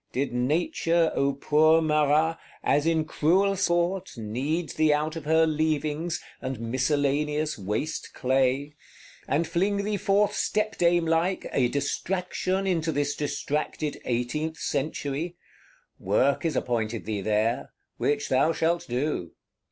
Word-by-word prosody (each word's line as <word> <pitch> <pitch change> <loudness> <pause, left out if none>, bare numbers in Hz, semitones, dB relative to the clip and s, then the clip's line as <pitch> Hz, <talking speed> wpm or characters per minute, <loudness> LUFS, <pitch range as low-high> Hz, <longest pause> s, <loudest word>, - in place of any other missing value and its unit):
Did 135 0 -1
Nature, 165 - +1
O 140 0 +1
poor 155 +3 +4
Marat, 155 +1 +2 0.2
as 145 +2 +2
in 160 -1 +2
cruel 185 +6 +2
sport, 175 -2 0
knead 135 +10 -2
thee 155 -1 +2
out 155 +2 0
of 160 -3 -6
her 160 +1 +4
leavings, 155 +1 -1 0.2
and 130 -2 -4
miscellaneous 145 +5 0
waste 105 +10 -3
clay; 135 +2 +1 0.5
and 150 +5 +1
fling 195 +5 0
thee 210 0 -1
forth 200 +2 +2
stepdamelike, 175 -4 +1
a 130 -3 +3
Distraction 180 +7 -1
into 165 -4 0
this 145 -1 -1
distracted 150 0 -3
Eighteenth 130 +7 -2
Century? 145 +3 -2 0.6
Work 130 - +1
is 160 -4 0
appointed 115 -3 -1
thee 105 -2 -2
there; 110 +3 0 0.3
which 145 0 0
thou 135 +5 +3
shalt 170 +2 0
do. 125 - -2
150 Hz, 120 wpm, -26 LUFS, 135-165 Hz, 0.6 s, poor